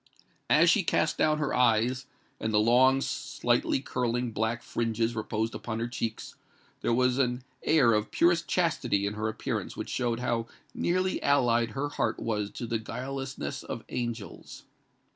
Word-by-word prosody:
As - - +6
she - - +4
cast - - 0
down 155 0 +3
her 150 -2 -1
eyes, 125 +2 +2 0.3
and 110 - -2
the 105 - +3
long 130 +4 +5
slightly 135 - 0
curling 120 -2 -1
black 110 +2 -1
fringes 115 0 -1
reposed 110 0 -2
upon 110 +1 -4
her 115 +1 -2
cheeks, 115 -2 -4 0.5
there - - 0
was 125 +2 +2
an 125 -1 0 0.2
air 130 -8 +4
of 105 0 0
purest 170 0 +2
chastity 130 - +1
in 100 - -2
her 110 +1 -2
appearance 110 - -4
which - - -5
showed 120 -2 -1
how 120 -2 -1 0.3
nearly 185 +2 0
allied 120 -5 +3
her 145 +2 -1
heart 120 -6 -1
was 105 -3 -2
to 120 - -6
the 115 -1 -1
guilelessness 130 - -5
of - - -6
angels. 120 -4 -5
120 Hz, 160 wpm, -28 LUFS, 110-130 Hz, 0.5 s, As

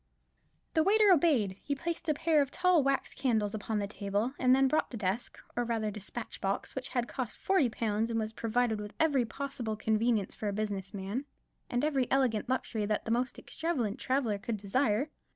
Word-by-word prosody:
The 320 - +4
waiter 415 +3 +5
obeyed; 275 - +3
he 285 - -2
placed 335 +3 -3
a 305 - +3
pair 310 0 +3
of 280 - 0
tall 365 0 +3
wax 275 0 0
candles 220 -6 0
upon 220 0 -2
the 205 - 0
table; 205 +4 -2
and 255 0 +5
then 270 0 +4
brought 305 +4 +1
the 240 - -6
desk, 205 +4 -2 0.2
or 240 - +1
rather 225 -2 -1
despatch 210 +3 -7
box, 195 0 -2
which 265 0 -4
had 245 -3 -1
cost 255 -5 -4
forty 375 -10 +2
pounds, 220 0 -1
and 225 -1 0
was 220 0 -3
provided 230 -1 0
with 210 0 -7
every 285 -6 +3
possible 250 -3 -4
convenience 220 -1 +1
for 215 - -4
a 200 - -1
business 200 -2 -3
man, 200 +7 -4 0.4
and 245 +4 +1
every 270 -5 +1
elegant 255 -4 +1
luxury 225 -4 -1
that 215 0 -1
the 225 - -2
most 245 +2 0
extravagant 260 -11 -2
traveller 255 -6 0
could 225 +1 -3
desire. 220 +6 +1
235 Hz, 195 wpm, -31 LUFS, 210-275 Hz, 0.4 s, waiter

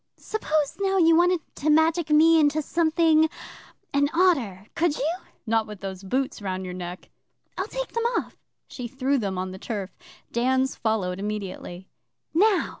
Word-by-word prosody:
'Suppose, 310 -9 -1
now, 390 -1 +1
you 330 -2 +5
wanted 350 0 +3
to 305 - -2
magic 320 +1 +3
me 320 +2 +6
into 295 0 +3
something 320 0 +3 0.6
an 285 0 +3
otter? 265 - +2
Could 330 -2 +1
you?' 310 +6 0 0.3
'Not 225 -1 +1
with 210 -2 -9
those 190 -1 -6
boots 255 +5 -2
round 190 -1 -3
your 180 - -5
neck.' 180 0 -7 0.4
'I'll - - -3
take - - -4
them 465 0 -2
off.' - - -4 0.3
She 250 -3 -6
threw 265 +2 0
them 195 -4 -2
on 185 0 -3
the 190 - -9
turf. 200 -4 -4 0.4
Dan's 260 +2 +1
followed 195 -5 -1
immediately. 195 -3 -5 0.5
'Now! 395 +3 +3
275 Hz, 160 wpm, -25 LUFS, 200-325 Hz, 0.6 s, me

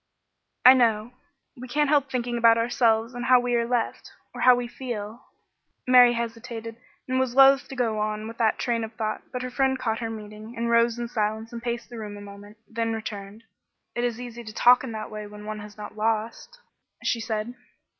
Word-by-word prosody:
"I 255 - +11
know. 230 -3 +2 0.4
We 255 +1 -9
can't 295 +4 +1
help 285 -2 +3
thinking 245 -2 -2
about 230 -1 +5
ourselves 230 0 +1
and 245 0 -5
how 255 0 +6
we 245 0 -1
are 235 -1 +1
left 240 -1 -2 0.2
or - - -7
how 250 -1 +7
we 245 0 -3
feel 235 -3 -7 0.3
" - - -48
Mary 250 -1 +7
hesitated 230 -1 -5 0.3
and 260 0 0
was 255 -2 -1
loath 275 0 +6
to 270 - -8
go 230 -4 0
on 215 0 -2
with 230 +1 -10
that 220 -2 +2
train 235 -2 -1
of 220 0 -6
thought, 215 -1 -3
but 250 0 -4
her 255 - -5
friend 265 +1 +1
caught 225 -3 -2
her 230 -1 -3
meaning 215 +1 -9
and 235 0 -1
rose 235 0 +3
in 240 0 -3
silence 220 0 -2
and 235 - -6
paced 235 0 -4
the 235 - -7
room 205 -1 -7
a - - -10
moment, 205 +1 -12
then 225 0 -2
returned. 210 -1 -7 0.5
"It 240 - -2
is 240 -1 -1
easy 240 -1 -8
to 215 -1 -9
talk 250 +1 +6
in 260 - -5
that 215 0 -6
way 210 -1 -6
when 210 0 -11
one 215 0 -5
has 210 0 -11
not 210 - -8
lost," 225 - -2 0.5
she 235 - 0
said. 220 +1 -3
230 Hz, 215 wpm, -25 LUFS, 215-245 Hz, 0.5 s, I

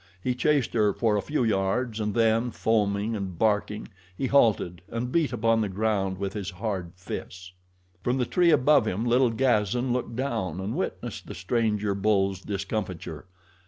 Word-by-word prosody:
He 125 +7 -1
chased 140 0 +1
her 105 -3 +3
for 110 0 +1
a 105 - +1
few 150 +1 -1
yards 110 +2 0
and 105 -1 -2
then, 115 +1 +3
foaming 105 -1 0
and 95 -4 -5
barking, 105 0 0 0.3
he 135 - -1
halted 110 -9 +2
and 120 +2 -3
beat 165 -2 +2
upon 115 -1 +2
the 105 - -1
ground 95 -1 0
with 100 0 -3
his 100 -3 -4
hard 95 -3 -4
fists. 90 0 -7 0.5
From 125 +2 +1
the 125 - +1
tree 175 +6 +3
above 150 -5 +4
him 110 +3 -1
little 125 +1 +4
Gazan 120 0 +1
looked 120 -2 -3
down 115 - -2
and 95 +3 -3
witnessed - - -4
the - - -7
stranger 105 -4 0
bull's 95 -1 +1
discomfiture. 95 -5 -4
110 Hz, 165 wpm, -26 LUFS, 100-120 Hz, 0.5 s, above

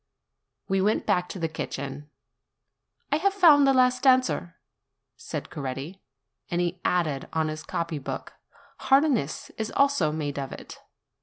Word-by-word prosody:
We 195 0 +1
went 210 +3 +1
back 180 0 +1
to - - -6
the 165 -2 -1
kitchen. 145 -2 -6 1.0
"I 295 - +3
have 390 +4 +1
found 300 -7 +7
the - - +6
last 255 +1 +3
answer," 255 -9 +3 0.6
said - - -6
Coretti; 140 +7 -6 0.5
and 175 - -1
he 175 +1 -2
added 155 -6 0
on 160 -1 0
his 155 0 -5
copy 165 -3 -3
book, 135 - -6 0.5
Harness 270 - +1
is 220 0 -2
also 275 - +3
made 145 -2 -3
of 135 -1 -5
it. - - -10
175 Hz, 145 wpm, -26 LUFS, 155-255 Hz, 1.0 s, found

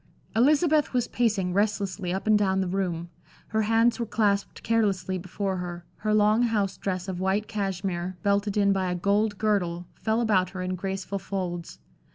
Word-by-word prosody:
Elizabeth 300 +5 +3
was 245 -2 +1
pacing 205 -7 0
restlessly 200 -3 0
up 190 +1 -3
and 215 0 +5
down 190 -2 +2
the 190 - 0
room. 175 -2 -2 0.4
Her 220 0 +1
hands 225 +3 +3
were 235 - 0
clasped 205 -2 0
carelessly 195 -5 +1
before 190 +1 -3
her, 175 -1 -6
her 215 - -1
long 215 +2 +4
house 215 -5 +1
dress 185 -1 -3
of 185 -2 -4
white 190 +3 0
cashmere, 190 -3 -3
belted 200 0 +1
in 200 -1 +4
by 190 -1 0
a - - -1
gold 205 +3 +1
girdle, 180 -5 0
fell 220 +1 -1
about 200 -6 +2
her 185 -1 -5
in 185 0 -2
graceful 195 +1 -3
folds. 180 - -4
195 Hz, 175 wpm, -26 LUFS, 185-215 Hz, 0.4 s, and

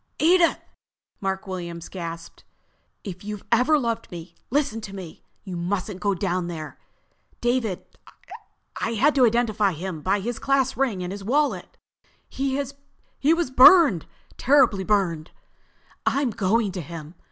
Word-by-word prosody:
"Edith!" 340 +2 +4 0.6
Mark 195 0 -3
Williams 170 -3 -6
gasped. 170 -2 -8 0.6
"If 185 -2 -8
you've 210 -1 -6
ever 255 +7 +4
loved 230 -4 -2
me, 170 0 -9 0.2
listen 275 -4 0
to 195 -2 -8
me. 180 -5 -9 0.2
You 185 -3 -6
mustn't 185 +2 -3
go 200 -1 0
down 180 -1 -1
there. 160 -3 -7 0.6
David—I 240 -1 -5
had 280 +7 +3
to 260 -3 +5
identify 220 -4 +1
him 165 0 -6
by 195 +5 +1
his 230 +4 -4
class 275 -2 +1
ring 225 -7 -1
and 180 - -4
his 200 0 -7
wallet. 285 +8 -1 0.5
He 270 0 -2
was 280 +3 -2
burned—terribly 265 - +5
burned!" 175 -6 0 0.8
"I'm 275 -3 +1
going 210 +1 +1
to 185 -1 -5
him!" 160 0 -9
205 Hz, 130 wpm, -24 LUFS, 180-260 Hz, 0.8 s, to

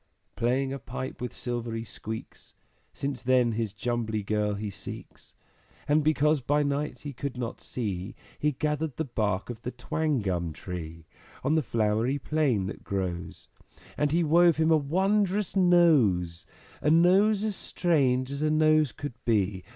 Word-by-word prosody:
Playing 130 +3 0
a 135 - -5
pipe 130 +2 -6
with 125 - -3
silvery 120 -2 -4
squeaks, 110 0 -8 0.4
Since 140 -2 -4
then 125 -1 +3
his 110 -2 -2
Jumbly 110 0 -2
Girl 105 0 0
he 105 0 -4
seeks; - - -10 0.5
And 150 +1 +3
because 150 -1 +3
by 145 +4 +2
night 145 +1 -2
he 145 -1 -6
could 135 0 -5
not 120 -2 -4
see, 100 -4 -4 0.2
He 150 0 +1
gathered 150 +1 -2
the 160 - -1
bark 105 -4 -1
of 115 -1 -9
the 125 - -4
Twangum 125 - -1
Tree 85 -2 -7 0.4
On 140 +4 +2
the 160 - +3
flowery 115 +2 0
plain 140 -8 0
that 95 - -6
grows. 90 -3 -4 0.5
And 150 - +1
he 170 +2 +2
wove 170 +1 +5
him 160 0 +3
a - - +7
wondrous 190 +6 +1
Nose, 145 - +3 0.3
A 150 - +2
Nose 190 +6 +4
as 215 -2 -1
strange 135 -9 +1
as 140 +1 -4
a 155 - +2
Nose 155 -2 +4
could 145 -3 -6
be! 100 -4 +1
130 Hz, 155 wpm, -28 LUFS, 110-155 Hz, 0.5 s, a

